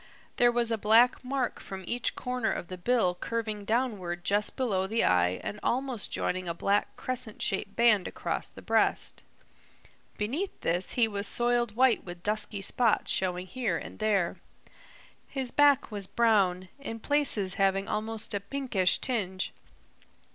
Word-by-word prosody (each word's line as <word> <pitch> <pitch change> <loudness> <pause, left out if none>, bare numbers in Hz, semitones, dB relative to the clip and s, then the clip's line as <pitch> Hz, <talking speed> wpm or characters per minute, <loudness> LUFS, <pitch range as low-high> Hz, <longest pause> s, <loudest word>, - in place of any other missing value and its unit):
There 240 0 +5
was 235 -1 +1
a 225 - 0
black 230 +5 +4
mark 255 -1 -2
from 190 -1 -8
each 240 +6 -1
corner 250 -3 -1
of 175 - -4
the 185 - -6
bill 220 -2 +2
curving 215 +1 -4
downward 205 -7 -1
just 205 +2 +1
below 200 -8 0
the 225 +3 +1
eye 90 0 +2
and 210 - -5
almost 255 -3 -1
joining 185 0 -2
a 170 - -2
black 200 +4 0
crescent 255 -4 -4
shaped 195 +1 -1
band 225 -5 +4
across - - -3
the - - -13
breast. - - +1 0.9
Beneath 280 - -2
this 175 +3 +1
he 235 -2 +4
was 205 -1 -1
soiled 240 -2 +2
white 255 -1 +4
with 175 -1 -9
dusky 210 -1 -1
spots 230 +3 +1
showing 180 -1 0
here 215 -4 -2
and - - -9
there. 205 -5 +1 0.9
His 265 -3 -3
back 285 -4 +4
was 200 -2 -3
brown, 190 -6 +2
in 225 -5 -6
places 230 -9 0
having 195 0 +2
almost 215 0 -3
a 205 - 0
pinkish 200 -3 0
tinge. 190 -7 -2
215 Hz, 155 wpm, -29 LUFS, 190-240 Hz, 0.9 s, There